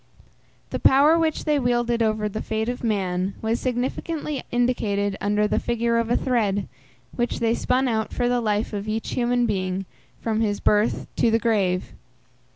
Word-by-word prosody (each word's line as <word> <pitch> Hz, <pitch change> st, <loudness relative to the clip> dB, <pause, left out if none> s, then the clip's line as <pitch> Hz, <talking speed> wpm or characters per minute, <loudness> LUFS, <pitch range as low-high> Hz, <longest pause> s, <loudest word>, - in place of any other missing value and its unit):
The -, -, -2 dB
power 285 Hz, +4 st, +5 dB
which 320 Hz, -2 st, 0 dB
they 300 Hz, -2 st, +2 dB
wielded 240 Hz, -2 st, +1 dB
over 215 Hz, -1 st, +1 dB
the 210 Hz, +1 st, -4 dB
fate 220 Hz, 0 st, -2 dB
of 245 Hz, 0 st, -4 dB
man 190 Hz, -3 st, -1 dB
was 225 Hz, +1 st, -1 dB
significantly 265 Hz, +3 st, -2 dB
indicated 210 Hz, -5 st, 0 dB
under 210 Hz, +1 st, +2 dB
the -, -, +1 dB
figure 235 Hz, 0 st, 0 dB
of 230 Hz, -1 st, -1 dB
a 240 Hz, -, +3 dB
thread, 205 Hz, -6 st, 0 dB, 0.5 s
which 240 Hz, 0 st, -1 dB
they 230 Hz, -1 st, +2 dB
spun 255 Hz, +2 st, +1 dB
out 220 Hz, -2 st, -1 dB
for 245 Hz, -, 0 dB
the 245 Hz, 0 st, +1 dB
life 215 Hz, 0 st, -1 dB
of 205 Hz, 0 st, -4 dB
each 220 Hz, +1 st, -3 dB
human 245 Hz, 0 st, +1 dB
being 190 Hz, -3 st, -2 dB, 0.3 s
from 220 Hz, -1 st, -1 dB
his 205 Hz, -2 st, 0 dB
birth 210 Hz, +1 st, +2 dB
to -, -, +3 dB
the 225 Hz, -, +3 dB
grave. 200 Hz, -6 st, 0 dB
225 Hz, 170 wpm, -24 LUFS, 210-245 Hz, 0.5 s, power